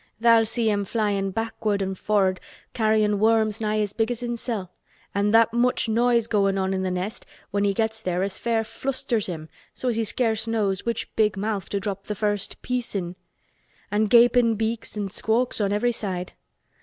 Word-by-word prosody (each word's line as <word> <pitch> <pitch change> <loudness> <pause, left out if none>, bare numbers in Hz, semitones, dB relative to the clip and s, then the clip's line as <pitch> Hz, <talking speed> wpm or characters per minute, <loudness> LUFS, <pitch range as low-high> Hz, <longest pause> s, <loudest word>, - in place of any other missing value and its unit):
Tha'll 230 -1 +5
see 230 0 -1
him 205 -1 +1
flyin' 200 -2 0
backward 220 0 -2
an' 190 -1 -2
for'ard 190 -1 +1 0.3
carryin' 215 -2 +2
worms 220 0 +2
nigh 215 0 +1
as 205 -1 -2
big 225 0 0
as 245 -1 -3
himsel' 235 -5 -3 0.4
an' 200 +1 +1
that 225 +1 +5
much 250 +1 +2
noise 235 +1 +2
goin' 200 -3 +1
on 190 0 0
in 190 0 -1
th' 185 - -1
nest 185 +4 -3 0.3
when 205 0 +1
he 200 - +3
gets 220 0 -1
there 180 -2 -1
as 195 -1 -2
fair 230 -1 0
flusters 235 0 -2
him 160 -4 -6 0.3
so 255 - -2
as 230 - -1
he 230 - +1
scarce 225 0 0
knows 210 -3 -1
which 235 - -3
big 210 -3 +2
mouth 205 -1 -2
to 200 - -1
drop 195 0 -5
th' 210 - -3
first 205 -1 -2
piece 250 -3 -2
in. 175 -2 -3 0.8
An' 210 +1 +2
gapin' 235 +1 +5
beaks 220 0 -3
an' 200 -2 -3
squawks 230 +3 0
on 200 -1 +1
every 225 +4 +2
side. 185 -6 -4
215 Hz, 190 wpm, -24 LUFS, 200-230 Hz, 0.8 s, Tha'll